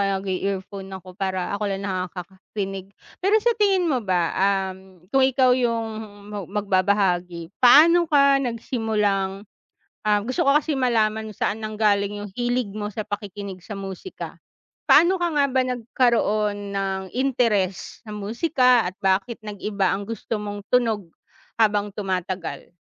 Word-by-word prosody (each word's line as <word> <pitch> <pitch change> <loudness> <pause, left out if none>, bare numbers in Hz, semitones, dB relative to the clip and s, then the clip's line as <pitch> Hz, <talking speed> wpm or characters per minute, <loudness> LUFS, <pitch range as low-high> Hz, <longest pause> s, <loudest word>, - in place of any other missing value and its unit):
kaya 195 0 +1
nag-i-earphone 195 0 -3
ako 185 0 -12
para 190 -2 -2
ako 210 0 -2
lang 195 +1 -4
nakakarinig. 190 +1 -5 0.4
Pero 405 +3 +5
sa 480 - +4
tingin 390 -3 +3
mo 255 - +1
ba, 180 -3 +1 0.4
um, 190 -1 -17
kung 270 - +4
ikaw 260 -1 +4
yung 230 -2 0 0.7
magbabahagi, 185 -4 +1 0.2
paano 335 +7 +8
ka 280 -2 +5
nagsimulang 210 -5 -1 0.6
ah, 210 -1 +3
gusto 255 - 0
ko 275 - +5
kasi 310 0 -2
malaman 220 -4 +1
kung - - -24
saan 210 - 0
nanggaling 205 -1 0
yung - - -11
hilig 245 -1 0
mo 210 -1 -3
sa 215 - -3
pakikinig 205 -2 -6
sa 210 - -7
musika. 195 - -7 0.5
Paano 365 +3 +6
ka 345 - +1
nga 290 -1 +3
ba 260 0 +3
nagkaroon 220 -3 +1 0.2
ng 195 -1 -1
interes 230 -8 0
sa 215 - -7
musika 250 +3 +2
at 185 - -5
bakit 195 +5 +1
nag-iba 205 -2 -1
ang 200 +1 -2
gusto 230 0 -4
mong 205 0 -5
tunog 220 -8 +1 0.5
habang 210 -2 +3
tumatagal? 185 -3 -4
210 Hz, 140 wpm, -23 LUFS, 195-245 Hz, 0.7 s, paano